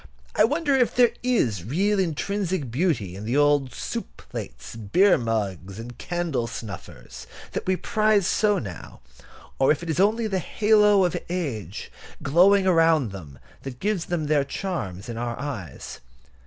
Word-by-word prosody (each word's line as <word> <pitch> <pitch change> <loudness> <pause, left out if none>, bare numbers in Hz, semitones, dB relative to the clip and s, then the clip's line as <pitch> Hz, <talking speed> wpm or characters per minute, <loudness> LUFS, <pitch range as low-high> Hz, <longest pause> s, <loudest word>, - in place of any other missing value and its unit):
I - - +5
wonder 290 +3 0
if 255 -3 +2
there 245 -2 +5
is 125 - +1
real 195 - +1
intrinsic 185 - -1
beauty 125 - 0
in 100 - -7
the 120 +6 0
old 145 -3 +3
soup - - -5
plates, - - -7
beer 115 - +4
mugs, 100 -5 -3
and 120 +2 -8
candle 170 -9 -2
snuffers 110 -3 -9 0.2
that - - -4
we 185 - +3
prize 215 0 +2
so 205 +2 +2
now, 95 - -8 0.6
or 135 - +5
if 155 +2 -1
it 165 - -2
is 155 - -2
only 220 +4 +3
the 195 -3 0
halo 210 +1 +4
of 175 - -1
age 120 - -4 0.3
glowing 190 +7 +5
around 165 - +3
them 75 -8 -10 0.2
that 130 -2 -8
gives 205 -4 -1
them 170 -3 -2
their 145 -1 +2
charms 135 - -4
in 115 -1 -5
our 120 -1 -3
eyes. 105 - -6
155 Hz, 155 wpm, -24 LUFS, -, 0.6 s, I